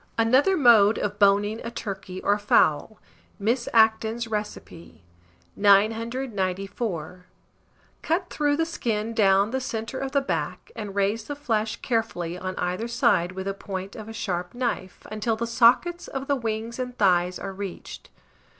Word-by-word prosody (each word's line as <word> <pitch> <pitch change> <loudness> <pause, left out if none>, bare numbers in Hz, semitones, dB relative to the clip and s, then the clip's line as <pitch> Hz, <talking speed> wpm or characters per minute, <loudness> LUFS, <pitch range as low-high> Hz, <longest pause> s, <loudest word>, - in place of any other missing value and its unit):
ANOTHER 260 +12 +4
MODE 225 -6 +6
OF 205 0 -3
BONING 205 +2 +3
A 235 - -4
TURKEY 195 -4 -6
OR 205 +1 +2
FOWL. 205 0 +2 0.4
(Miss 235 +4 0
Acton's 225 +1 +3
Recipe.) 210 - -6 0.5
994. 200 -4 0 0.7
Cut 355 +3 -1
through 290 -1 +1
the 325 - +1
skin 230 -9 -2
down 200 -1 +3
the 265 +1 -1
centre 225 +1 -4
of 270 0 -3
the 280 - +4
back, 275 - -4
and 205 -3 -6
raise 205 +2 0
the 290 - -5
flesh 225 -6 -1
carefully 205 -8 -1
on 185 +1 -5
either 180 +6 -2
side 235 -8 +2
with 190 0 -6
the 195 - -2
point 195 0 -6
of 215 0 -8
a - - -6
sharp 180 -4 -4
knife, 240 -7 -3
until 215 +1 -1
the 230 +1 -3
sockets 250 +9 +3
of 270 0 -5
the 280 - +1
wings 230 -1 -4
and 250 -1 -4
thighs 180 -2 +2
are 195 - -6
reached. 195 -2 -8
220 Hz, 150 wpm, -25 LUFS, 195-235 Hz, 0.7 s, MODE